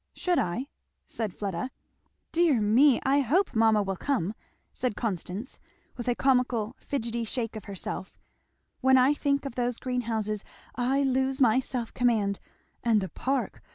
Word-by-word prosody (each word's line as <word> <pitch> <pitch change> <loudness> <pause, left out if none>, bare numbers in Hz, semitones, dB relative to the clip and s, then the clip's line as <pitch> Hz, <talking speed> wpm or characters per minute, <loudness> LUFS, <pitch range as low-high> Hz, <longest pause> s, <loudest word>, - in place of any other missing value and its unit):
"Should 360 -2 +1
I?" 180 +9 -1 0.4
said 220 -4 -3
Fleda. 195 +5 -3 0.6
"Dear 330 -7 +3
me! 235 +5 +5
I 275 +2 +4
hope 320 - +2
mamma 220 -2 +4
will 195 -1 -2
come!" 220 -8 -1 0.4
said 250 -4 -2
Constance 205 +1 -4 0.4
with 240 - -6
a 245 - +2
comical 250 -3 +1
fidgety 235 -4 -3
shake 230 0 -3
of 215 - -7
herself; 195 -1 -6 0.6
"when 265 0 +5
I 260 +3 +5
think 280 -1 0
of 275 - -4
those 245 -1 -1
greenhouses 225 -5 -2 0.3
I 265 +3 +1
lose 265 0 +1
my 245 -2 +5
self 250 -3 -4
command. 220 -5 +1 0.4
And 230 -3 +4
the 190 -2 -3
park! 265 +9 -2
245 Hz, 150 wpm, -28 LUFS, 215-265 Hz, 0.6 s, me